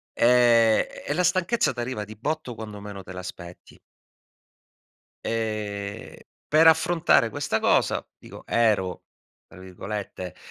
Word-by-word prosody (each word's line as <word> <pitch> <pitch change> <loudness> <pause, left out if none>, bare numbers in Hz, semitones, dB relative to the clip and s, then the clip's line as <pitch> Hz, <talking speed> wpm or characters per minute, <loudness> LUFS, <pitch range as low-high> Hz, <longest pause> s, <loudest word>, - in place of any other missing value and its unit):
e 120 -2 +4 0.2
e - - 0
la 180 +4 +1
stanchezza 185 - +1
t'arriva 120 -3 -4
di 110 - -11
botto 145 +2 -3
quando 105 -2 -8
meno 100 -1 -8
te 90 - -10
l'aspetti. 90 -1 -10 1.4
Ehm, 105 -2 -4 0.3
per 160 +2 +5
affrontare 160 -6 +4
questa 145 -4 -2
cosa - - +2
dico, - - -13
ero 105 -6 +1 0.4
tra - - -15
virgolette 95 0 -7
110 Hz, 115 wpm, -25 LUFS, 100-145 Hz, 1.4 s, per